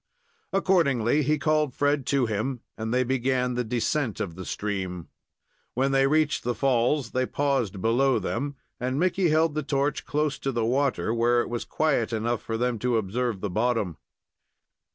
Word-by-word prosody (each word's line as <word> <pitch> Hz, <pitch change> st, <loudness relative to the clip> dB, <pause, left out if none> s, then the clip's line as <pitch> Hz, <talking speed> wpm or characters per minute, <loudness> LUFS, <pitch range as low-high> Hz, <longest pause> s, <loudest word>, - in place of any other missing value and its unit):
Accordingly, 150 Hz, -, +2 dB
he 150 Hz, +2 st, +1 dB
called 155 Hz, -2 st, +1 dB
Fred 145 Hz, -2 st, +1 dB
to 140 Hz, -3 st, +2 dB
him, 115 Hz, +3 st, -2 dB
and 110 Hz, 0 st, -4 dB
they 125 Hz, +1 st, +2 dB
began 125 Hz, 0 st, 0 dB
the 125 Hz, 0 st, -1 dB
descent 120 Hz, +1 st, -1 dB
of 100 Hz, -6 st, -3 dB
the 95 Hz, +2 st, -8 dB
stream. 95 Hz, -4 st, -4 dB, 0.7 s
When 135 Hz, +2 st, +1 dB
they 135 Hz, 0 st, +4 dB
reached 155 Hz, 0 st, +1 dB
the 120 Hz, 0 st, -1 dB
falls, 130 Hz, +2 st, +1 dB
they 130 Hz, 0 st, 0 dB
paused 130 Hz, -10 st, -1 dB
below 125 Hz, +4 st, +3 dB
them, 140 Hz, +4 st, -3 dB, 0.2 s
and 130 Hz, +3 st, -1 dB
Micky 185 Hz, 0 st, +2 dB
held 160 Hz, 0 st, +3 dB
the 155 Hz, -, -1 dB
torch 140 Hz, 0 st, -1 dB
close 150 Hz, -1 st, 0 dB
to 135 Hz, -, -2 dB
the 115 Hz, -3 st, 0 dB
water, 130 Hz, -1 st, +1 dB
where 120 Hz, +1 st, +3 dB
it -, -, -4 dB
was 120 Hz, -1 st, -3 dB
quiet 125 Hz, -8 st, 0 dB
enough 115 Hz, +2 st, -1 dB
for 115 Hz, -, -3 dB
them 120 Hz, -1 st, 0 dB
to 125 Hz, 0 st, +1 dB
observe 110 Hz, 0 st, -2 dB
the 105 Hz, -, -2 dB
bottom. 110 Hz, -, 0 dB
125 Hz, 175 wpm, -26 LUFS, 115-140 Hz, 0.7 s, they